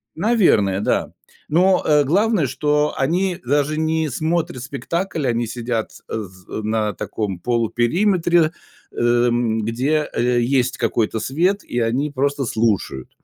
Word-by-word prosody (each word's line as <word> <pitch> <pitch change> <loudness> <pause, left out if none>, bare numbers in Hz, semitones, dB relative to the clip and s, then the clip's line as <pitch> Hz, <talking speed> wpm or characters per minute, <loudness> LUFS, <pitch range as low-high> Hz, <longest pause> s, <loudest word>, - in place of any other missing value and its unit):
Наверное, 165 - +3
да. 105 - 0 0.4
Но, 180 +4 +3
э, 150 -1 +4
главное, 195 - +2
что 150 +3 0
они 175 +6 0
даже 145 +3 +1
не 160 0 0
смотрят 160 -1 -2
спектакль, 160 +3 -3
они 120 0 0
сидят, 115 -1 -3 0.2
э, - - -8
з 95 -2 -14
э, - - -4
на 110 -1 0
таком 100 -1 -4
полупериметре, 160 - +2 0.4
эм, 120 -1 +1
где, 135 +8 0
э, 120 +1 +1
есть 125 0 +1
какой-то 110 -1 0
свет, 175 - 0
и 120 - -3
они 125 +6 0
просто 140 0 -1
слушают. 110 - -1
135 Hz, 130 wpm, -20 LUFS, 115-160 Hz, 0.4 s, э